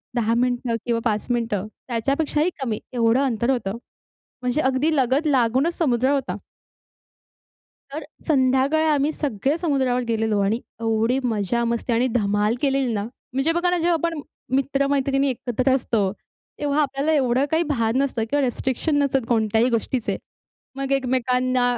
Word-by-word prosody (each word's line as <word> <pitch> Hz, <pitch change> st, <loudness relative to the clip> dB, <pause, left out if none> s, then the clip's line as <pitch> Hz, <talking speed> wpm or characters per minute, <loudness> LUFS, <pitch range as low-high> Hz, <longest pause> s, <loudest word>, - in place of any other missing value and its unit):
10 230 Hz, -1 st, +1 dB
मिनिटं 245 Hz, -1 st, 0 dB
किंवा 235 Hz, -1 st, +1 dB
5 215 Hz, -2 st, 0 dB
मिनिटं 225 Hz, -4 st, -1 dB, 0.2 s
त्याच्यापेक्षाही 280 Hz, +7 st, 0 dB
कमी 225 Hz, -5 st, -2 dB
एवढं 235 Hz, +2 st, +3 dB
अंतर 235 Hz, -1 st, 0 dB
होतं. 225 Hz, -5 st, -2 dB, 0.6 s
म्हणजे 250 Hz, +5 st, 0 dB
अगदी 265 Hz, +5 st, +1 dB
लगत 270 Hz, +3 st, +2 dB
लागूनच 265 Hz, +4 st, +2 dB
समुद्र 260 Hz, -5 st, +2 dB
होता. 275 Hz, -2 st, -1 dB, 1.6 s
तर 305 Hz, +1 st, -5 dB, 0.2 s
संध्याकाळी 270 Hz, +2 st, +3 dB
आम्ही 295 Hz, -1 st, +2 dB
सगळे 280 Hz, +1 st, -1 dB
समुद्रावर 265 Hz, -7 st, +1 dB
गेलेलो 220 Hz, -2 st, +1 dB
आणि 220 Hz, +5 st, 0 dB, 0.2 s
एवढी 225 Hz, +3 st, +1 dB
मजा-मस्ती 235 Hz, +2 st, 0 dB
आणि 240 Hz, +3 st, +2 dB
धमाल 210 Hz, 0 st, +1 dB
केलेली 270 Hz, -3 st, +1 dB
ना. 205 Hz, -, -1 dB, 0.3 s
म्हणजे 270 Hz, +5 st, +1 dB
बघा 345 Hz, +1 st, +1 dB
ना, 355 Hz, -, +1 dB
जेव्हा 340 Hz, +1 st, +2 dB
आपण 330 Hz, -1 st, -1 dB, 0.4 s
मित्र-मैत्रिणी 275 Hz, 0 st, +1 dB
एकत्र 255 Hz, +1 st, 0 dB
असतो, 220 Hz, -6 st, 0 dB, 0.5 s
तेव्हा 290 Hz, +1 st, +1 dB
आपल्याला 280 Hz, +2 st, 0 dB
एवढं 260 Hz, -2 st, +2 dB
काही 320 Hz, +1 st, +2 dB
भान 230 Hz, -4 st, 0 dB
नसतं 255 Hz, -5 st, -1 dB
किंवा 290 Hz, -1 st, +2 dB
रिस्ट्रिक्शन 260 Hz, +4 st, -1 dB
नसतात 270 Hz, -1 st, +1 dB
कोणत्याही 225 Hz, +1 st, +2 dB
गोष्टीचे. 235 Hz, +1 st, -1 dB, 0.6 s
मग 275 Hz, 0 st, -2 dB
एकमेकांना 255 Hz, -1 st, +1 dB
255 Hz, 140 wpm, -23 LUFS, 230-280 Hz, 1.6 s, एवढं